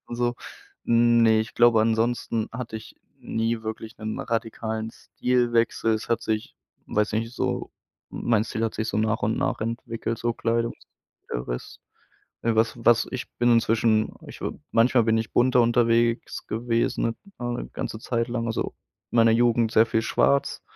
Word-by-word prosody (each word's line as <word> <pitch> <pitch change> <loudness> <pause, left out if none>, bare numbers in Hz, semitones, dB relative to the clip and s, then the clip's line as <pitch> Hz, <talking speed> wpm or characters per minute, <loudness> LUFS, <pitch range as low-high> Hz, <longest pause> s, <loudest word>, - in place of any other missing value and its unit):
und 120 - -6
so. 120 0 0 0.5
Ne, 115 -1 +4
ich 110 - -5
glaube, 120 -2 +5
ansonsten 115 0 0
hatte 115 -2 -5
ich 110 - -11 0.2
nie 115 0 -2
wirklich 110 0 -6
'nen 110 0 -4
radikalen 110 -1 -3
Stilwechsel. 120 -2 0
Es 110 - -5
hat 115 - 0
sich, 110 -1 -3 0.3
weiß 105 0 0
nicht, 115 +2 -2
so - - -2 0.4
mein 110 -2 +1
Stil 115 0 -2
hat 115 - -2
sich 110 +1 -2
so 105 - -1
nach 110 0 0
und 110 +1 +1
nach - - -1
entwickelt, 115 0 -3
so 120 0 0
Kleidung 115 0 0
und - - -22 0.5
der - - -3
Rest. - - -6 0.6
Äh, 115 -1 +1
was 115 +1 +2
was 115 -1 +5
ich 130 -1 -5
bin 120 0 +3
inzwischen 115 -1 +2
ich - - -11
w - - -2 0.2
manchmal 120 +1 +4
bin 110 0 +2
ich 110 0 -3
bunter 125 0 +4
unterwegs 115 0 +1
gewesen, 115 +1 0
ne, 115 - -1 0.2
ja, 120 - -4
'n 120 0 -4
ganze 110 - -4
Zeit 115 0 -1
lang. 120 -1 -2
Also, 115 - -2 0.4
in - - -5
meiner 115 0 +6
Jugend 115 -1 +3
sehr 110 0 +5
viel 115 - 0
Schwarz 70 - +1
115 Hz, 175 wpm, -25 LUFS, 110-120 Hz, 0.6 s, meiner